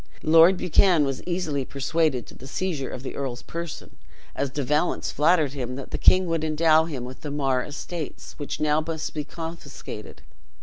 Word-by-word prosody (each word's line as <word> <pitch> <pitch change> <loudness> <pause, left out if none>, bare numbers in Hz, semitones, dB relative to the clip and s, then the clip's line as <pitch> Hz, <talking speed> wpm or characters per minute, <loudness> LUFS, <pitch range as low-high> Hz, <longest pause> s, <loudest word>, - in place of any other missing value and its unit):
Lord 165 +4 +7
Buchan 175 -3 +4
was 135 -1 -3
easily 165 -6 -1
persuaded 140 0 0
to - - -13
the 130 - -11
seizure 155 -3 -2
of 130 - -7
the 130 - -5
earl's 130 -3 -4
person, 170 -2 -7 0.4
as 140 - -1
De 145 +1 -3
Valence 150 +6 0
flattered 155 -2 +3
him 125 -3 -4
that 135 0 -8
the - - -3
king 185 0 +6
would 165 -2 -1
endow 160 0 +4
him 135 -7 -5
with 130 +1 -9
the 150 - -5
Mar 135 -3 +1
estates, 155 +2 -6
which 145 - -4
must 155 +1 +1
now 165 -1 -3
be 150 - -2
confiscated. 165 +2 -8
150 Hz, 180 wpm, -25 LUFS, 135-165 Hz, 0.4 s, Lord